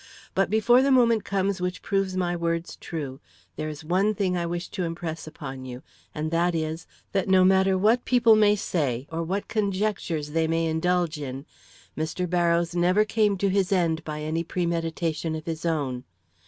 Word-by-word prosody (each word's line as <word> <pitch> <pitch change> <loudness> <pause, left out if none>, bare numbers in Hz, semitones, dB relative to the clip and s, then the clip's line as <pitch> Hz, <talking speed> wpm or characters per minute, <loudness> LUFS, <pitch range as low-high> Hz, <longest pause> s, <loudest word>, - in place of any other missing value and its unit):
But 195 - +1
before 220 +4 +4
the 275 - +2
moment 235 -4 +4
comes 195 -1 -1
which 180 0 -3
proves 195 -1 0
my 175 -1 0
words 170 0 -2
true, 140 -5 -6 0.4
there 155 0 -3
is 150 0 -8
one 195 +6 +2
thing 190 -3 0
I 170 -1 -1
wish 175 +1 -3
to 195 - -5
impress 165 -1 -4
upon 135 -4 -7
you, 125 0 -8 0.3
and 155 +1 -3
that 170 +1 +1
is: 160 +1 -3 0.2
That 195 -2 0
no 190 -1 +6
matter 190 0 +4
what 220 +6 +3
people 235 -3 +5
may 210 -1 +5
say, 140 - -1
or 165 +1 -2
what 190 +5 -2
conjectures 195 -7 -1
they 160 +1 +1
may 165 +1 +1
indulge 165 0 0
in, 135 0 -6 0.5
Mr. 160 +3 -2
Barrows 170 -1 +1
never 180 +4 +3
came 210 -2 +1
to 200 +1 +1
his 190 -1 +1
end 165 -4 +1
by 150 -1 -5
any 160 +2 -1
premeditation 165 -2 -2
of 155 0 -6
his 165 0 -3
own. 135 -6 -1
175 Hz, 180 wpm, -26 LUFS, 160-195 Hz, 0.5 s, no